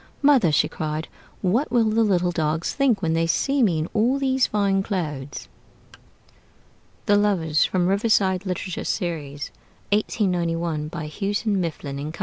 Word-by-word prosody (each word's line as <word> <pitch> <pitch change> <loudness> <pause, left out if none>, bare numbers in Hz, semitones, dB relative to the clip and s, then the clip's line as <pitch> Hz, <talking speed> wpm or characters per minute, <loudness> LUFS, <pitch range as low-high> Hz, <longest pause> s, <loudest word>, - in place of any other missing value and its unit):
'Mother,' 270 - +5
she 150 - +3
cried, 155 0 -4 0.4
'what 225 +11 +1
will 235 -2 +3
the 220 +1 +2
little 180 -4 +2
dogs 160 -1 -1
think 245 -8 +1
when 160 -1 +1
they 165 0 +1
see 275 +10 +1
me 185 -9 +3
in 155 +1 -1
all 240 +5 +2
these 265 -1 +2
fine 200 -2 +1
clothes?'" 150 -9 -4 1.6
THE 205 - +4
LOVERS 175 -7 +2
From 180 -2 0
'Riverside 195 -1 +2
Literature 185 -1 -4
Series': 150 -7 -3 0.4
1891, 170 -7 0
by 160 0 -6
Houghton, 200 +4 -1
Mifflin 150 -3 -4
& - - -15
Co. - - -11
185 Hz, 145 wpm, -23 LUFS, 160-210 Hz, 1.6 s, Mother